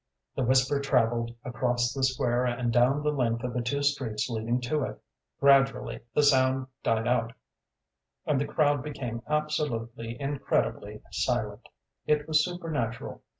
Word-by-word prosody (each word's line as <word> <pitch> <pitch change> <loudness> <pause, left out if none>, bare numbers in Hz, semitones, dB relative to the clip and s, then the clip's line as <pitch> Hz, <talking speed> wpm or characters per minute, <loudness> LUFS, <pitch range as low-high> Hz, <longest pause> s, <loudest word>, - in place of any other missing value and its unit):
The - - -1
whisper 130 +3 +3
travelled 120 -4 +1
across 120 -1 0
the 135 - -3
square 125 -2 +1
and 120 -1 -1
down 130 +5 +3
the 150 - +2
length 120 -4 0
of 125 -1 -3
the 125 - -1
two 140 +4 -1
streets 130 -7 0
leading 115 +2 -1
to 145 +5 -1
it; - - -4 0.4
gradually 135 -1 +3 0.2
the 150 - +4
sound 130 -2 +3 0.2
died 115 0 +1
out, 120 -2 +1 0.9
and 140 -3 +1
the 145 - -1
crowd 145 -3 +2
became 125 -6 -5
absolutely, 120 -7 -2
incredibly 140 0 -1
silent: - - -2 0.4
it 150 0 +2
was 155 -1 +4
supernatural. 160 -10 -4
130 Hz, 145 wpm, -28 LUFS, 120-145 Hz, 0.9 s, the